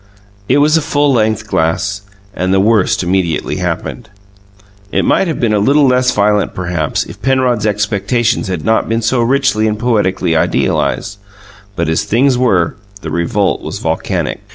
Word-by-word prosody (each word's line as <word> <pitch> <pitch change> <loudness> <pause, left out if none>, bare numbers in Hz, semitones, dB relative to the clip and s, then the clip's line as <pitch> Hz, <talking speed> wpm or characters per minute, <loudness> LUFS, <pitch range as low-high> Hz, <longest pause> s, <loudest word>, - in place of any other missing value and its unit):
It - - +4
was 150 +2 +4
a - - +1
full 145 -2 +1
length 110 -2 0
glass, 95 +3 -1 0.3
and 95 0 -2
the 95 - +3
worst 105 -2 +2
immediately 90 -3 -1
happened. 115 -3 -4 0.8
It - - 0
might 195 - +2
have 160 - -3
been 115 -3 +1
a 105 - +2
little 140 +7 +3
less 125 -1 +3
violent, 105 -2 +1
perhaps, 85 -4 -2
if - - -12
Penrod's 125 -5 +1
expectations 105 +3 0
had 90 -5 -4
not 110 0 +1
been 115 0 -1
so 120 +2 +1
richly 120 -3 +1
and 105 0 -1
poetically 95 -7 0
idealized; 100 +5 0 0.6
but 85 -2 -1
as 80 0 0
things 130 +4 +2
were, 100 -10 +1 0.2
the 80 - -6
revolt 90 +4 0
was - - -6
volcanic. - - -2
105 Hz, 160 wpm, -14 LUFS, 95-125 Hz, 0.8 s, It